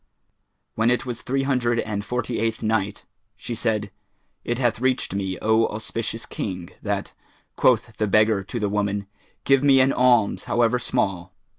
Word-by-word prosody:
When 110 +1 +2
it 125 +1 +1
was 120 -2 -4
Three 135 +1 -1
Hundred 120 -3 +1
and 105 -3 -3
Forty 125 +1 -2
eighth 115 0 -1
Night 110 -2 -1 0.3
She 120 - -6
said, 110 -3 -1 0.5
It 120 - -2
hath 120 -3 +1
reached 130 -6 0
me, 95 -2 -2
O 110 +1 +3
auspicious 115 +1 -4
King, 90 -3 -5
that, - - -3 0.4
quoth 115 -3 +2
the 105 - 0
beggar 105 0 +3
to 120 - -4
the 105 - 0
woman, 100 0 -1 0.4
"Give 135 0 +3
me 135 -2 +6
an 130 +1 +4
alms 120 -5 +3
however 120 +1 +2
small." 95 -8 -2
115 Hz, 160 wpm, -23 LUFS, 105-125 Hz, 0.5 s, me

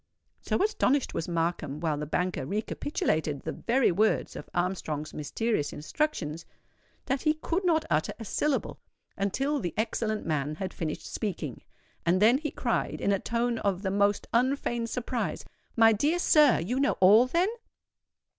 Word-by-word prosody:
_'" - - -13
So - - +2
astonished 285 - +1
was 160 - -3
Markham, 165 -4 -2
while 155 -3 -1
the 150 - -4
banker 180 -2 -1
recapitulated 160 - -1
the 160 - -3
very 245 +5 +2
words 215 +5 +1
of - - -8
Armstrong's 165 -4 -2
mysterious 155 +2 -1
instructions, 165 - -2 0.6
that 270 -1 -1
he 305 0 +2
could 335 +4 -2
not 325 -3 +2
utter 150 +1 +1
a 225 - -8
syllable 290 +7 -1 0.4
until 270 +9 0
the 175 -8 -4
excellent 215 -1 -1
man 150 -1 -1
had 185 +3 -5
finished 160 -1 -4
speaking; 170 - -4 0.4
and 175 +2 +2
then 230 +6 +5
he 305 0 -3
cried, 240 -4 -2
in 200 - +1
a 195 - +2
tone 235 +1 -1
of 195 -1 -1
the 190 - 0
most 200 +1 +2
unfeigned 240 -1 +1
surprise, 250 +1 -3 0.3
"My 225 -1 +6
dear 295 +11 +1
sir, 300 -6 +5
you 240 +11 -2
know 280 - +3
all, 210 +7 +7
then?" 345 +8 +2
210 Hz, 160 wpm, -28 LUFS, 165-260 Hz, 0.6 s, all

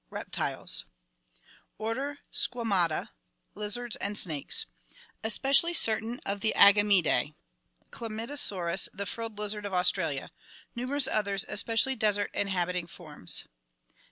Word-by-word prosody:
Reptiles - - -2 0.9
Order 265 +7 -4 0.2
Squama 215 -8 +1
ta. 155 - -5 0.4
Lizards 215 +3 -2
and 205 +1 -4
snakes. 170 - +2 0.6
Especially 275 +9 +5
certain 225 -1 +4
of 200 +1 -4
the 220 - 0
Agamidae. 200 -7 +4 0.6
Chlamydosaurus, 215 -6 -1
the 200 - -4
frilled 225 +1 -6
lizard 210 0 -2
of 195 - -5
Australia. 170 -6 0 0.4
Numerous 260 +3 +1
others, 200 -3 -1
especially 230 +5 +1
desert 210 -3 0
inhabiting 180 -3 -2
forms. 155 - -4
210 Hz, 100 wpm, -28 LUFS, 185-230 Hz, 0.9 s, Especially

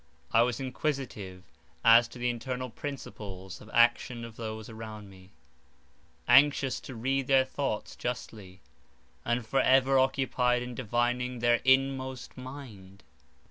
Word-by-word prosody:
I 115 - +5
was 120 +1 +1
inquisitive 130 -9 -4 0.4
as 115 +1 +7
to 120 - -12
the 120 0 -1
internal 125 +1 -5
principles 100 -9 -8
of 105 - -13
action 120 0 +2
of 115 -1 -11
those 110 -1 -6
around 110 -3 -9
me: 95 0 -16 1.0
anxious 135 -2 +5
to 130 - -9
read 135 +3 -1
their 135 -1 +5
thoughts 130 -5 -3
justly, 105 -6 -6 0.6
and 120 0 -1
for 135 +4 +1
ever 135 +1 +4
occupied 130 -2 +1
in 125 0 -6
divining 125 +1 -1
their 120 0 +2
inmost 130 -1 +1
mind. 120 -8 -10
120 Hz, 130 wpm, -29 LUFS, 110-130 Hz, 1.0 s, as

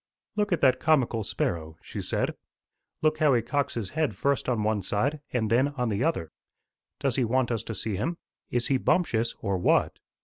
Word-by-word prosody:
"Look 210 -1 0
at 175 - +1
that 130 -2 +4
comical 130 -8 +2
sparrow," 80 -5 -2
she - - -6
said. - - -1 0.7
"Look 155 0 +2
how 150 -5 +5
he 115 - +1
cocks 140 +3 -1
his 110 -5 -3
head 150 -9 0
first 140 +5 0
on 115 -4 +1
one 110 -1 +1
side 130 - 0
and 110 -4 0
then 125 +4 +4
on 125 -3 0
the 105 +2 0
other. 120 - -1 0.7
Does 135 -3 0
he 130 - +3
want 125 +1 +1
us 115 -2 0
to 115 0 -6
see 100 0 -2
him? 165 - -2 0.3
Is 120 -1 0
he 135 - +4
bumptious, 120 -7 +1
or 100 -3 -1
what?" - - +2
125 Hz, 200 wpm, -27 LUFS, 110-140 Hz, 0.7 s, how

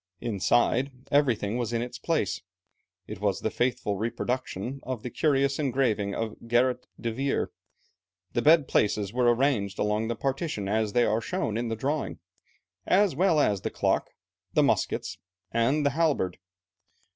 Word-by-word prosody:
Inside, 120 +4 +1 0.2
everything 120 -7 +2
was 120 -2 -2
in 115 0 0
its 125 0 -7
place. 160 - -1 0.6
It 105 0 -8
was 100 -2 0
the 110 - -1
faithful 120 -5 0
reproduction 120 +2 -3
of 125 -3 -5
the 125 - -5
curious 140 -1 +1
engraving 120 -8 0
of 115 -1 -3
Gerrit 125 +1 +2
de 115 - -2
Veer. 135 +3 -1 0.8
The - - +1
bed 155 -2 +5
places 105 -1 +1
were 120 -1 +4
arranged 120 -6 +1
along 105 +2 0
the 120 - -1
partition 135 - -2
as 105 0 0
they 120 - +4
are 110 +2 +1
shown 110 -1 -2
in 120 +1 -1
the 115 - -2
drawing, 140 +6 -2 0.7
as 195 -5 +3
well 170 -1 +3
as 105 -9 +2
the - - -2
clock, - - 0 0.4
the - - +4
muskets, - - 0 0.3
and 130 +6 +2
the 140 - +3
halberd. 145 - 0
120 Hz, 155 wpm, -27 LUFS, 110-140 Hz, 0.8 s, bed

